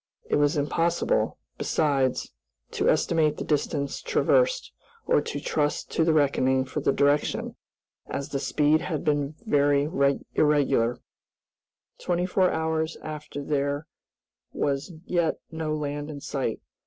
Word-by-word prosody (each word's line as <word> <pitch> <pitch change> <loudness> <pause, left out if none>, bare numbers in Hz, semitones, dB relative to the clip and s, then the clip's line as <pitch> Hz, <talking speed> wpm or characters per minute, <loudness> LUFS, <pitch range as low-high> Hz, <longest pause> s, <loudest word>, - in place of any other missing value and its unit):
It - - +1
was 145 0 +2
impossible, 170 - +1 0.2
besides, 135 -4 0 0.4
to - - +1
estimate 155 -3 +2
the - - -3
distance 145 -1 -1
traversed, - - +2 0.3
or - - +3
to 145 - -4
trust 150 0 -1
to 165 - +2
the 165 - +3
reckoning 130 -3 +2
for 130 +3 -4
the 140 - +2
direction, 145 +1 +1 0.5
as 140 - -4
the 140 - -2
speed 150 +2 +2
had 155 -5 -3
been 145 0 0
very 145 -5 +3 0.5
irregular. 140 -6 +2 1.0
Twenty 175 0 0
four 185 0 +2
hours 160 0 -1
after 150 -2 -6
there 145 +1 -1 0.7
was 140 +4 -1
yet 170 -2 +1 0.2
no 160 -1 -2
land 145 0 -4
in 145 -2 -6
sight. 135 -5 -3
150 Hz, 130 wpm, -26 LUFS, 140-160 Hz, 1.0 s, or